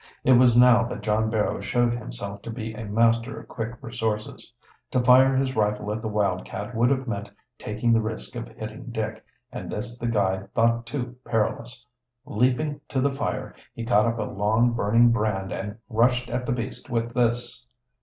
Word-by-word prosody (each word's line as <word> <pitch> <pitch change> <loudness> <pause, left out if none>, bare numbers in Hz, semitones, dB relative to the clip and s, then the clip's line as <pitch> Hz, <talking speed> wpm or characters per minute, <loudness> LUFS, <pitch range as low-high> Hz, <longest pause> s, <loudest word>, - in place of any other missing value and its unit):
It 130 - +4
was 120 -1 +6
now 125 -1 +7
that 120 - -5
John 110 +1 +1
Barrow 110 -3 0
showed 120 +4 +1
himself 100 - -6
to - - -8
be 110 -1 -5
a 110 0 -6
master 115 +4 +2
of - - -13
quick 115 +1 -4
resources. 110 -2 -4 0.4
To 130 - +1
fire 130 +2 +6
his 130 0 0
rifle 105 -1 0
at 110 - -4
the 110 - -3
wildcat 105 +1 -2
would 120 +2 +3
have 135 -1 0
meant 100 -2 -3 0.3
taking 110 +2 0
the 115 - +4
risk 110 0 -5
of - - -5
hitting - - -8
Dick, - - -4 0.3
and - - -6
this 120 +3 -5
the 120 - -2
guide 95 -3 0
thought 115 0 +2
too 125 -3 -4
perilous. 115 +2 -2 0.4
Leaping 130 +6 0
to 135 - -1
the 140 +1 +1
fire, 145 +1 -3 0.2
he 115 - -5
caught 110 -2 +4
up 115 0 -1
a - - -1
long, 110 +4 +2
burning 115 +2 +4
brand 105 -4 -1
and 105 +2 -5
rushed 120 +2 +2
at 125 -1 -2
the - - 0
beast 125 +3 -4
with 115 -1 -1
this. 120 0 0
115 Hz, 185 wpm, -25 LUFS, 105-125 Hz, 0.4 s, now